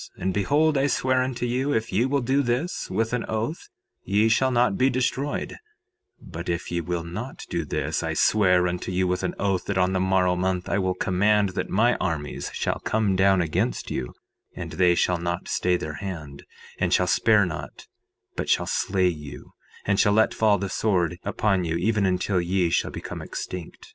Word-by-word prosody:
3:8 -, -, -15 dB
And 95 Hz, 0 st, 0 dB
behold, 145 Hz, -, +2 dB
I 140 Hz, -, +2 dB
swear 130 Hz, -1 st, +1 dB
unto 130 Hz, -1 st, -2 dB
you, 130 Hz, +4 st, 0 dB
if 110 Hz, +1 st, -1 dB
ye 115 Hz, +7 st, +2 dB
will 140 Hz, +1 st, +1 dB
do 135 Hz, +3 st, +2 dB
this, 130 Hz, +8 st, -2 dB
with 110 Hz, +5 st, -1 dB
an 125 Hz, -, 0 dB
oath, 110 Hz, +9 st, -3 dB, 0.3 s
ye 105 Hz, +3 st, +2 dB
shall 130 Hz, +4 st, +3 dB
not 120 Hz, -4 st, +2 dB
be 130 Hz, +4 st, +3 dB
destroyed; 130 Hz, +3 st, -2 dB, 0.6 s
but 85 Hz, +2 st, -8 dB
if 85 Hz, 0 st, -3 dB
ye 85 Hz, 0 st, -1 dB
will 85 Hz, +1 st, -3 dB
not 110 Hz, +10 st, -7 dB
do 85 Hz, -, -1 dB
this, 75 Hz, -, -2 dB
I -, -, -2 dB
swear 90 Hz, -4 st, +3 dB
unto 90 Hz, +1 st, -3 dB
you 90 Hz, 0 st, +1 dB
with 90 Hz, 0 st, -1 dB
an 90 Hz, -, -2 dB
oath, 95 Hz, -2 st, 0 dB
that 100 Hz, -, -2 dB
on 90 Hz, 0 st, +2 dB
the 95 Hz, -, +1 dB
morrow 95 Hz, -1 st, +2 dB
month 90 Hz, 0 st, -1 dB
I 100 Hz, -, 0 dB
will 95 Hz, -1 st, 0 dB
command 100 Hz, +3 st, +2 dB
that 90 Hz, -, -4 dB
my 115 Hz, +5 st, +3 dB
armies 75 Hz, -3 st, -3 dB
shall -, -, -2 dB
come 105 Hz, -3 st, 0 dB
down 95 Hz, -1 st, +4 dB
against 80 Hz, -3 st, -2 dB
you, 60 Hz, -, -4 dB, 0.4 s
and 85 Hz, -2 st, -6 dB
they 90 Hz, +1 st, +3 dB
shall 90 Hz, 0 st, +1 dB
not 85 Hz, 0 st, -3 dB
stay 90 Hz, 0 st, +1 dB
their 75 Hz, -3 st, -6 dB
hand 75 Hz, -6 st, -7 dB, 0.3 s
and -, -, 0 dB
shall -, -, +3 dB
spare -, -, +4 dB
not, -, -, -7 dB, 0.5 s
but -, -, -3 dB
shall -, -, +2 dB
slay 95 Hz, -1 st, +1 dB
you, 75 Hz, -5 st, -6 dB, 0.3 s
and 100 Hz, 0 st, +1 dB
shall 105 Hz, -1 st, +4 dB
let 110 Hz, +1 st, +3 dB
fall 105 Hz, -2 st, +3 dB
the 100 Hz, -, -3 dB
sword 90 Hz, -4 st, 0 dB
upon 100 Hz, -4 st, 0 dB
you 80 Hz, -1 st, -1 dB
even 100 Hz, +3 st, +1 dB
until 90 Hz, 0 st, +1 dB
ye 90 Hz, -1 st, 0 dB
shall -, -, +1 dB
become -, -, -7 dB
extinct. 90 Hz, -3 st, -7 dB
95 Hz, 200 wpm, -25 LUFS, 90-115 Hz, 0.6 s, down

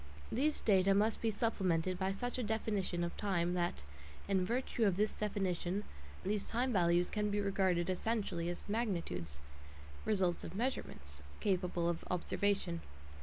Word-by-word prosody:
These 295 Hz, +5 st, +1 dB
data 195 Hz, -2 st, +4 dB
must 215 Hz, +2 st, +2 dB
be 225 Hz, -, +2 dB
supplemented 185 Hz, -5 st, +1 dB
by 190 Hz, 0 st, +1 dB
such 245 Hz, +6 st, -3 dB
a -, -, 0 dB
definition 210 Hz, -5 st, 0 dB
of 170 Hz, -, -3 dB
time 175 Hz, -4 st, +1 dB
that, 175 Hz, -, -1 dB, 0.4 s
in 195 Hz, -2 st, +2 dB
virtue 235 Hz, +2 st, 0 dB
of 190 Hz, -3 st, +3 dB
this 210 Hz, +1 st, +2 dB
definition, 195 Hz, -2 st, -1 dB, 0.4 s
these 205 Hz, +1 st, +1 dB
time 245 Hz, +4 st, 0 dB
values 175 Hz, -2 st, +3 dB
can 210 Hz, 0 st, 0 dB
be 205 Hz, 0 st, 0 dB
regarded 190 Hz, -3 st, +2 dB
essentially 185 Hz, -3 st, -1 dB
as 175 Hz, -, -5 dB
magnitudes 180 Hz, -, -2 dB, 0.6 s
(results 190 Hz, -5 st, +1 dB
of -, -, -6 dB
measurements) 75 Hz, -, -3 dB, 0.2 s
capable 180 Hz, -3 st, +1 dB
of 170 Hz, -1 st, -1 dB
observation. 180 Hz, -1 st, 0 dB
195 Hz, 145 wpm, -36 LUFS, 175-210 Hz, 0.6 s, data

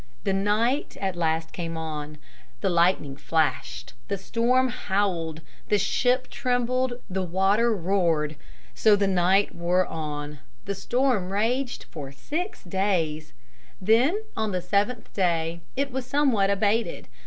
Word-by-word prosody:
The 195 Hz, -, +1 dB
night 215 Hz, +8 st, +1 dB
at 190 Hz, -2 st, -1 dB
last 160 Hz, -1 st, 0 dB
came 165 Hz, -2 st, -4 dB
on. 155 Hz, -2 st, -5 dB, 0.4 s
The 190 Hz, -, +1 dB
lightning 170 Hz, -5 st, +2 dB
flashed. 155 Hz, -5 st, -1 dB
The 200 Hz, -, -1 dB
storm 245 Hz, +6 st, +2 dB
howled. 190 Hz, -8 st, -1 dB, 0.3 s
The 210 Hz, -, +4 dB
ship 250 Hz, +6 st, +1 dB
trembled. 250 Hz, 0 st, 0 dB
The 190 Hz, 0 st, -2 dB
water 195 Hz, +6 st, +2 dB
roared. 170 Hz, -5 st, +1 dB, 0.4 s
So 215 Hz, -1 st, +5 dB
the 205 Hz, 0 st, +1 dB
night 190 Hz, +1 st, +3 dB
wore 175 Hz, +2 st, +1 dB
on. 150 Hz, -2 st, -5 dB, 0.3 s
The 200 Hz, -, -2 dB
storm 210 Hz, -1 st, 0 dB
raged 245 Hz, +6 st, 0 dB
for 140 Hz, -4 st, -7 dB
six 310 Hz, -, -4 dB
days. 175 Hz, -5 st, -1 dB, 0.5 s
Then 245 Hz, -, +3 dB
on 220 Hz, -1 st, -1 dB
the 180 Hz, -1 st, -1 dB
seventh 205 Hz, +6 st, 0 dB
day 170 Hz, -3 st, 0 dB
it 275 Hz, +1 st, -1 dB
was 255 Hz, -1 st, -4 dB
somewhat 255 Hz, -10 st, +3 dB
abated. 205 Hz, +3 st, 0 dB
195 Hz, 130 wpm, -26 LUFS, 165-235 Hz, 0.5 s, So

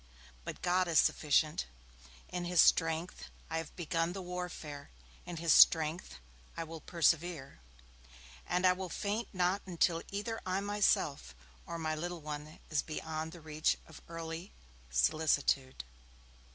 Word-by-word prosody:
But -, -, -7 dB
God 180 Hz, 0 st, +2 dB
is 165 Hz, -2 st, +2 dB
sufficient. 150 Hz, -, +3 dB, 0.6 s
In 180 Hz, -1 st, -3 dB
his 175 Hz, -1 st, +1 dB
strength 165 Hz, +2 st, +3 dB, 0.3 s
I 160 Hz, -, 0 dB
have 160 Hz, -, -8 dB
begun 165 Hz, 0 st, -1 dB
the 195 Hz, -, -5 dB
warfare, 175 Hz, -5 st, -6 dB, 0.4 s
in 175 Hz, -, -5 dB
his 165 Hz, 0 st, +3 dB
strength 160 Hz, -, +5 dB, 0.4 s
I 165 Hz, -, -2 dB
will 160 Hz, -1 st, -8 dB
persevere, 170 Hz, -, 0 dB, 0.9 s
and 180 Hz, +1 st, +1 dB
I 180 Hz, -, +7 dB
will 185 Hz, 0 st, -5 dB
faint 210 Hz, +6 st, -2 dB
not 185 Hz, +2 st, +1 dB
until 170 Hz, -1 st, +1 dB
either 215 Hz, +3 st, -3 dB
I 185 Hz, +1 st, 0 dB
myself 200 Hz, -, +1 dB, 0.3 s
or 170 Hz, -, -4 dB
my 160 Hz, -1 st, -1 dB
little 175 Hz, +2 st, -4 dB
one 150 Hz, 0 st, -7 dB
is 155 Hz, -, +2 dB
beyond 160 Hz, 0 st, -4 dB
the 175 Hz, -1 st, -11 dB
reach 155 Hz, 0 st, 0 dB
of 160 Hz, -, -13 dB
earthly 165 Hz, +2 st, -6 dB, 0.4 s
solicitude.' 135 Hz, -, +1 dB
165 Hz, 140 wpm, -33 LUFS, 155-180 Hz, 0.9 s, I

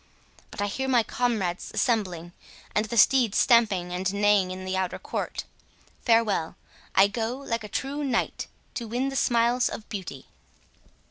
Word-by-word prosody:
—But 205 Hz, -, -4 dB
I -, -, +1 dB
hear 265 Hz, +7 st, -3 dB
my 245 Hz, -3 st, +4 dB
comrades 215 Hz, -8 st, -1 dB
assembling, 185 Hz, -8 st, 0 dB, 0.4 s
and 210 Hz, -, +1 dB
the 235 Hz, -, -4 dB
steeds 235 Hz, 0 st, +5 dB
stamping 210 Hz, -8 st, +3 dB
and 185 Hz, +1 st, -1 dB
neighing 205 Hz, -2 st, +3 dB
in 185 Hz, 0 st, -6 dB
the 185 Hz, 0 st, -2 dB
outer 185 Hz, -1 st, -1 dB
court.—Farewell.—I 210 Hz, -4 st, -1 dB
go, 225 Hz, +4 st, -3 dB
like 230 Hz, -5 st, -3 dB
a -, -, -6 dB
true 280 Hz, +7 st, -3 dB
knight, 260 Hz, -4 st, -1 dB, 0.3 s
to 235 Hz, -, -5 dB
win 250 Hz, +4 st, -1 dB
the 270 Hz, -, -6 dB
smiles 240 Hz, -1 st, +2 dB
of 220 Hz, -, -7 dB
beauty." 185 Hz, -, -6 dB
220 Hz, 145 wpm, -26 LUFS, 190-240 Hz, 0.4 s, steeds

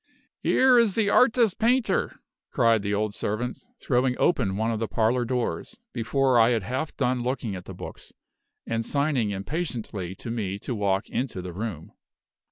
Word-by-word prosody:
"Here 255 Hz, -2 st, +5 dB
is 225 Hz, -5 st, +3 dB
the 210 Hz, -3 st, +2 dB
Artist 235 Hz, -5 st, +4 dB
Painter!" 240 Hz, +2 st, +1 dB, 0.3 s
cried 115 Hz, -4 st, +3 dB
the 100 Hz, 0 st, -2 dB
old 105 Hz, 0 st, 0 dB
servant, 110 Hz, +5 st, -3 dB, 0.2 s
throwing 125 Hz, -1 st, +1 dB
open 105 Hz, -, +1 dB
one 110 Hz, +2 st, 0 dB
of 110 Hz, -, -2 dB
the 115 Hz, -, -1 dB
parlor 115 Hz, +4 st, +1 dB
doors, 125 Hz, -, -2 dB, 0.2 s
before 130 Hz, +2 st, +2 dB
I 115 Hz, +1 st, +6 dB
had 115 Hz, -4 st, +1 dB
half 130 Hz, -, -3 dB
done 125 Hz, -2 st, +1 dB
looking 120 Hz, -4 st, -2 dB
at 90 Hz, -, -8 dB
the -, -, -8 dB
books, -, -, -9 dB, 0.5 s
and 115 Hz, 0 st, -1 dB
signing 140 Hz, -5 st, 0 dB
impatiently 100 Hz, -, -4 dB
to 115 Hz, -, -6 dB
me 100 Hz, -4 st, -2 dB
to 110 Hz, -, -5 dB
walk 100 Hz, -2 st, 0 dB
into 125 Hz, -6 st, -3 dB
the 90 Hz, -1 st, -6 dB
room. 95 Hz, -5 st, -5 dB
120 Hz, 170 wpm, -26 LUFS, 105-140 Hz, 0.5 s, I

